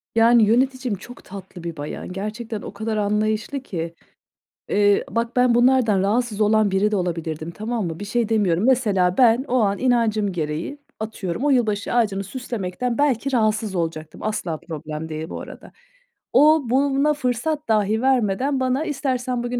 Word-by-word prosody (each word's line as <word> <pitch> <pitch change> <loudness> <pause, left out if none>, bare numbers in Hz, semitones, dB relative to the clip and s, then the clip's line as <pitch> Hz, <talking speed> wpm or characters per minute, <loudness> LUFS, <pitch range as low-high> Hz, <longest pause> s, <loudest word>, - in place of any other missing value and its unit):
Yani, 230 0 +6
yöneticim 255 +1 +1
çok 240 +6 -12
tatlı 190 -2 -10
bir 170 -2 -5
bayan. 145 +4 -6
Gerçekten 215 +3 -5
o - - -8
kadar 215 +1 -3
anlayışlı 215 +5 0
ki. 170 -9 -5 0.8
Eee, 205 0 +3
bak, 230 +1 -2
ben 250 -1 +4
bunlardan 240 -5 +4
rahatsız 215 +2 0
olan 215 -1 +3
biri 200 +2 +2
de 210 - +1
olabilirdim. 165 -3 -3
Tamam 215 0 -3
mı? 165 0 -6
Bir 205 - -5
şey 230 +1 -1
demiyorum. 200 -5 +2
Mesela 200 -8 +2
ben 245 0 +5
o 255 - -1
an 200 -1 +1
inancım 225 -5 +1
gereği, 160 - -3 0.2
atıyorum, 220 +1 -4
o - - +3
yılbaşı 220 -5 +1
ağacını 205 -5 +1
süslemekten 235 0 -4
belki 275 -2 +1
rahatsız 215 -3 +1
olacaktım. 160 -2 -4
Asla 210 -7 -2
problem 155 -1 -7
değil 155 +1 -5
bu - - -6
arada. - - -11 0.6
O 310 +1 +6
buna 275 +3 +2
fırsat 290 +3 -2
dahi 215 0 +2
vermeden 260 +1 +1
bana, 260 +4 0
"İstersen 255 -4 -2
bugün, 245 0 -2
220 Hz, 160 wpm, -22 LUFS, 195-250 Hz, 0.8 s, Yani